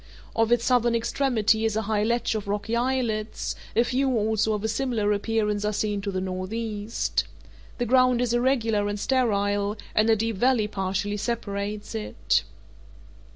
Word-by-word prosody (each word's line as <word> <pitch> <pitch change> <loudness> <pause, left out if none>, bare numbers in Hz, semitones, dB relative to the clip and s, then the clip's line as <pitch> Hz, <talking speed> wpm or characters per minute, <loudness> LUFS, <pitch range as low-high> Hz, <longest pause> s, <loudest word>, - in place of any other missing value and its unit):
Off 225 0 +2
its 240 -1 +3
southern 240 -2 +3
extremity 230 -2 +1
is 220 -1 +1
a 220 - 0
high 210 0 0
ledge 235 +1 +1
of 215 -2 -4
rocky 205 +3 -1
islets; 235 -3 -1 0.2
a 230 - +5
few 260 +2 0
also 220 0 +1
of 210 -1 -3
a - - +1
similar 220 -2 0
appearance 210 0 0
are 210 - +1
seen 210 -1 -1
to 200 - -3
the 190 -1 -2
northeast. 205 +4 -2 0.5
The 245 - -1
ground 255 0 +4
is 245 -1 +1
irregular 235 -4 +1
and 205 0 -3
sterile, 205 -4 +1 0.2
and 215 +1 +3
a 225 - +6
deep 225 -1 -2
valley 245 -1 +3
partially 195 +1 -2
separates 205 -2 -3
it. 105 -1 0
220 Hz, 160 wpm, -25 LUFS, 205-235 Hz, 0.5 s, a